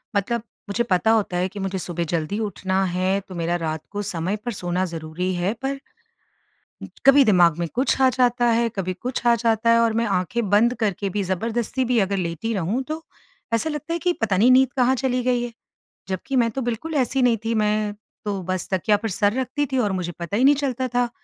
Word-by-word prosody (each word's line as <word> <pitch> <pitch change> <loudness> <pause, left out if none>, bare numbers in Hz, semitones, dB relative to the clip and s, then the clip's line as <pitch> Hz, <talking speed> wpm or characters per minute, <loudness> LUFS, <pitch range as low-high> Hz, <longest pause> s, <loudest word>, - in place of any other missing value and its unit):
मतलब 225 +3 0 0.3
मुझे 220 +4 0
पता 220 0 +2
होता 205 -5 +1
है 180 +1 +1
कि 205 - -8
मुझे 195 0 -2
सुबह 175 -1 -3
ज़ल्दी 170 +6 -1
उठना 190 -1 -1
है 185 +2 +1
तो 185 - -9
मेरा 170 0 -1
रात 155 0 -3
को 205 0 -3
समय 175 +4 -2
पर 240 - -1
सोना 180 0 -1
ज़रूरी 165 +2 -4
है 180 +4 0
पर 275 0 -2 1.0
इच - - -12
कभी 275 +1 +8
दिमाग 175 -6 +4
में 170 - -1
कुछ 260 +2 +1
आ 260 - +6
जाता 245 0 +2
है, 230 +1 +2
कभी 185 -1 -2
कुछ 245 +5 -5
आ 235 - +6
जाता 230 0 +1
है 230 0 +6
और 230 -1 +3
मैं 230 +1 +1
आँखें 220 +3 -2
बंद 220 +5 +4
करके 200 -2 -1
भी 205 - +1
ज़बरदस्ती 230 +7 -1
भी 245 -1 +2
अगर 200 0 0
लेटी 175 +5 -2
रहूँ 200 +6 -1
तो 315 +1 -5 0.5
ऐसा 230 +8 +1
लगता 300 +2 -4
है 340 - -1
कि 355 +1 +1
पता 205 -4 +1
नहीं 235 +6 +5
नींद 260 0 +5
कहाँ 255 +1 +4
चली 255 -1 0
गई 245 -1 +1
है? 240 - -5 0.6
जबकि 190 +8 -3
मैं 235 -2 +3
तो 265 - -3
बिल्कुल 245 +7 -3
ऐसी 265 0 +1
नहीं 245 -2 +3
थी। 230 - 0
मैं 210 -1 +1 0.3
तो 200 -2 -2
बस 185 -2 -2
तकिया 195 +3 +2
पर 220 +2 -4
सर 205 +2 +1
रखती 260 +3 -1
थी 265 - 0
और 205 - 0
मुझे 180 -2 -2
पता 170 +4 -3
ही 245 - +2
नहीं 285 +2 +6
चलता 260 -2 -1
था 245 0 0
220 Hz, 225 wpm, -23 LUFS, 185-245 Hz, 1.0 s, कभी